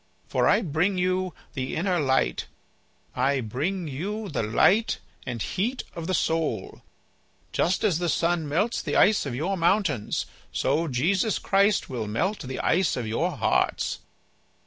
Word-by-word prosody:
For - - +1
I - - +4
bring 175 +4 +1
you 185 0 0 0.2
the 130 -1 -3
inner 180 +1 +1
light; 130 -3 +1 0.7
I 135 +2 +2
bring 155 - -2
you 200 +10 -4
the 140 - -1
light 190 - +3 0.3
and 120 -2 -3
heat 235 - -2
of 165 -1 -6
the 185 - +1
soul. 160 - -1 0.7
Just 180 +2 +1
as 185 -7 +2
the 175 -1 0
sun 165 0 +1
melts 205 +10 +1
the - - -3
ice 200 -6 +4
of 125 - -3
your 170 +9 -1
mountains 170 - +1 0.3
so 155 +5 +1
Jesus 180 - +1
Christ 200 +1 +2
will 120 -5 -4
melt 185 - -1
the 130 0 -5
ice 180 -3 +2
of 125 - -2
your 110 +1 -1
hearts." - - +1
165 Hz, 150 wpm, -26 LUFS, 130-190 Hz, 0.7 s, I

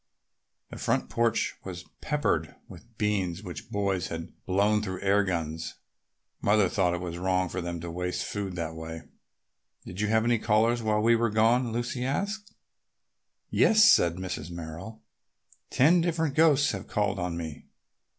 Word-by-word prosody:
The - - -8
front - - 0
porch 115 -1 +1
was 90 -2 -7 0.2
peppered 140 - -1
with 115 -2 -15
beans 100 -3 -1
which 85 -8 -8
boys 100 -3 -1
had 80 +1 -6
blown 100 +3 +2
through 95 -3 -5
air 100 +1 +3
guns. 80 -3 -3 0.7
Mother 105 -1 +4
thought 90 -2 +1
it 85 -1 -5
wrong 95 0 +1
for 95 - -3
them 85 0 -4
to 85 0 -5
waste 90 +1 -3
food 100 -1 -3
in 95 - -7
that 85 -2 -3
way. 80 0 -7 0.8
"Did 90 +3 -6
you 105 - +1
have 110 +1 +2
any 120 -1 +2
callers 115 +3 +2
while 105 -1 +1
we 115 +2 +5
were 115 0 +1
gone?" 115 +3 +3
Lucy 120 +2 -2
asked. 205 +10 -3 1.0
"Yes," 215 -1 +5
said 85 - +5
Mrs. 90 -3 -5
Merrill. 85 +6 -8 0.7
"Ten 165 +7 +4
different 165 -3 0
ghosts 150 -2 +4
have - - -6
called 105 -2 0
on 90 -1 -2
me. 80 -3 -7
100 Hz, 160 wpm, -28 LUFS, 85-115 Hz, 1.0 s, we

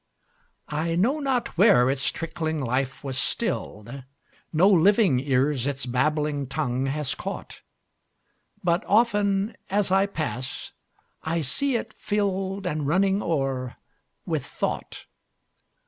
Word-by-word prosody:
I 160 +2 -1
know 245 - +2
not 260 - -1
where 130 - +6
its 135 +1 +2
trickling 160 -1 -3
life 130 +1 -2
was 135 -2 -2
still'd; 120 +6 -2 0.5
No 170 +4 +4
living 195 - +5
ears 135 0 +1
its 140 -1 -2
babbling 145 +2 0
tongue 135 -2 -1
has 145 0 -1
caught; - - -7 1.0
But 170 0 +2
often, 205 -1 +2
as 200 -1 +1
I 195 +1 +4
pass, 135 -8 -4 0.5
I 165 +1 -1
see 255 - 0
it 220 -1 -3
fill'dAnd 195 -6 -1
running 195 +5 +2
o'er 135 -7 -1 0.5
with - - -1
thought. - - -4
160 Hz, 115 wpm, -25 LUFS, 135-195 Hz, 1.0 s, where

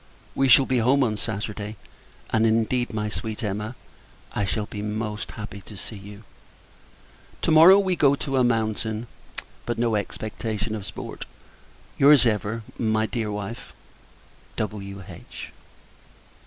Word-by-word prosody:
We 135 - +2
shall 130 +1 +7
be 130 -2 +1
home 130 +4 +4
on 110 -4 +1
Saturday; 105 0 -4 0.6
and, 110 - +3
indeed, 115 +3 +1
my 105 -1 -2
sweet 110 +2 -4
Emma, 105 +3 -3 0.6
I 100 - 0
shall 105 +1 -1
be 105 0 -6
most 105 0 -3
happy 105 -2 -7
to 105 +1 -12
see 110 - -7
you. 100 +2 -10 1.2
To - - +3
morrow, 165 +5 +9
we 190 -2 +2
go 140 -4 +4
to 135 -1 -2
a 130 - +5
mountain; 110 -1 0 0.6
but 120 - -2
no 115 0 +2
great 105 - +3
expectation 110 +1 -4
of 105 -3 -5
sport. - - -7 0.7
Your's, 140 -2 +7
ever, 110 0 0 0.2
my 110 -1 +2
dear 110 -2 -2
wife, 105 +3 -6 0.8
W.H. 100 -3 -6
110 Hz, 140 wpm, -25 LUFS, 105-120 Hz, 1.2 s, morrow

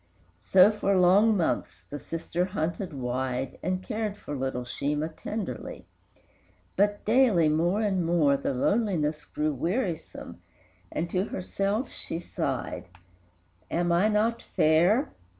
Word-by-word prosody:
So, 190 +2 +6
for 200 -2 +1
long 200 +4 +5
months, 170 - -2
the 145 - -5
sister 165 +3 -3
hunted 180 0 -3
wide, 130 -1 -3
And 185 0 -2
cared 215 -1 -3
for 145 - -6
little 130 -2 -2
Sheemah 150 +5 -2
tenderly; 215 -2 -5 0.9
But, 205 +1 +1
daily 215 -9 +4
more 175 +7 +1
and 195 -4 +1
more, 165 -4 +3
the 140 - -2
loneliness 160 - 0
Grew 150 0 -2
wearisome, 170 - -3 0.5
and 165 - -2
to 185 +1 +1
herself 200 +5 -2
she - - -5
sighed, 170 - -4 0.8
"Am 175 0 0
I 175 +5 +4
not 220 +2 +1
fair? 175 - +2
175 Hz, 125 wpm, -27 LUFS, 155-205 Hz, 0.9 s, So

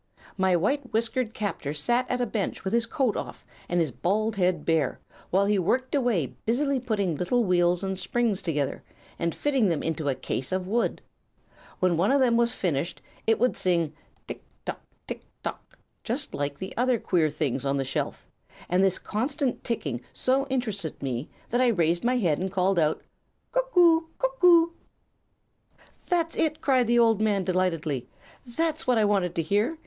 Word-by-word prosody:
"My 190 -1 +2
white 255 - 0
whiskered 230 +1 0
captor 190 -8 -3
sat 240 +11 0
at 250 - 0
a 245 - +1
bench 210 -3 -3
with 190 +2 -2
his 235 -1 +2
coat 260 -5 0
off - - -6 0.2
and 175 - +1
his 160 -5 +1
bald 215 - 0
head 180 -4 +1
bare, 160 -5 +1 0.3
while 195 +2 +3
he 205 -1 +2
worked 255 +9 0
away 240 - +1
busily 275 +4 +1
putting 210 -8 -1
little 210 - +1
wheels 175 -2 +2
and 190 0 -1
springs 205 +2 0
together, 145 -5 -2 0.4
and 170 -1 -1
fitting 270 -7 +2
them 165 -5 0
into 160 -2 -1
a 135 - 0
case 130 - -4
of 185 0 -1
wood. 230 +4 0 0.8
When 180 -2 +2
one 190 +8 +3
of 280 - +4
them 245 -3 +4
was 235 0 +3
finished 170 - -2 0.3
it 225 - +4
would 250 +2 +2
sing 170 -4 +1 0.3
'tick - - -7 0.2
tock! - - -4 0.3
tick - - -5 0.2
tock!' - - -7 0.3
just - - -3
like 140 0 -2
the 190 - -7
other 250 0 +2
queer 170 -7 +1
things 145 -3 -2
on 140 0 0
the 135 - -1
shelf, 135 - -3 0.4
and 180 +2 +3
this 190 -1 +3
constant 260 +4 -2
ticking 170 - -3
so 270 +2 +1
interested 215 - -3
me 130 +1 -3 0.2
that 245 +2 +2
I 255 - +5
raised 170 -6 +2
my 250 +1 +2
head 170 -10 +1
and 190 +1 -2
called: 185 -1 +2
"'Cuck 475 - -3
oo! 330 -2 +5
cuck - - -2
oo!'" 335 -1 +6 1.3
"'That's 335 -2 0
it!' 310 -1 +1
cried 255 -4 +2
the 240 +1 +3
old 225 -3 +4
man, 205 -3 +2
delightedly. 165 -8 -1 0.4
'That's 315 +5 -1
what 250 -2 +4
I 215 - +4
wanted 195 -4 +1
to 165 - 0
hear. 210 - +1
205 Hz, 180 wpm, -26 LUFS, 170-250 Hz, 1.3 s, oo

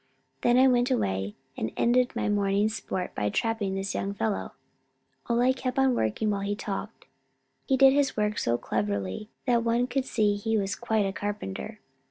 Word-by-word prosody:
Then 240 0 +4
I 260 +1 +7
went 245 0 +3
away, 95 - -1 0.2
and 110 - -3
ended 245 +1 +2
my - - -1
morning's 205 +1 +1
sport 190 -3 -4
by 105 0 -1
trapping 215 - -1
this 195 +1 -3
young 200 +1 -2
fellow." 210 0 -2 0.8
Ole 245 +2 +3
kept 255 0 -4
on 265 -1 +4
working 160 - 0
while 200 -1 -1
he 200 +1 -1
talked. 210 +1 -6 0.6
He 265 - +3
did 270 0 +7
his 280 -3 +1
work 210 0 0
so 120 0 +1
cleverly 100 - -2 0.2
that 240 -3 +2
one 235 +1 +2
could 255 +1 -1
see 210 -4 +2
he 225 +2 0
was 195 -1 -1
quite 220 -3 0
a 195 - -2
carpenter. 200 - -5
210 Hz, 180 wpm, -27 LUFS, 195-245 Hz, 0.8 s, I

